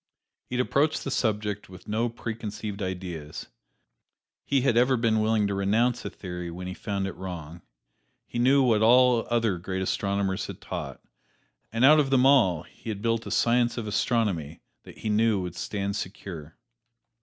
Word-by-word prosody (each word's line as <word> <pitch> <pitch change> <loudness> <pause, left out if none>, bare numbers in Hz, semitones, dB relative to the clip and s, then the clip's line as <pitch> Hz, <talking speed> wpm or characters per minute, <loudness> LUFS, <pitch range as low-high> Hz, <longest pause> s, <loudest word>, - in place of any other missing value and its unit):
He 125 - -2
had 125 - +2
approached 150 +3 +1
the 135 - -4
subject 105 -4 -1
with 95 0 -13
no 115 +3 0
preconceived 110 -3 -6
ideas; 90 -5 -5 0.9
he 140 -2 +1
had 125 -3 +2
ever 125 +2 +4
been 115 -1 +2
willing 110 -1 +2
to 100 - -1
renounce 115 +6 +1
a - - -4
theory 90 -2 -6
when 90 +2 -7
he 90 - -4
found 100 0 -3
it 95 - -5
wrong. 85 -3 -7 0.6
He 120 - -5
knew 135 +3 +5
what 115 -4 +3
all 125 +1 +5
other 115 -6 +1
great 95 +1 -3
astronomers 100 0 -1
had - - -8
taught, - - -6 0.7
and 115 +3 +3
out 155 +2 +8
of 140 -2 +2
them 130 -1 +4
all 115 - +4
he - - -11
had 105 -1 -4
built 115 0 0
a - - -4
Science 120 +1 +2
of 115 - -3
Astronomy 105 - -1 0.2
that - - -13
he 110 - -4
knew 110 -1 +3
would 90 -2 -4
stand 100 +1 -3
secure. 90 -6 -7
105 Hz, 175 wpm, -27 LUFS, 95-120 Hz, 0.9 s, out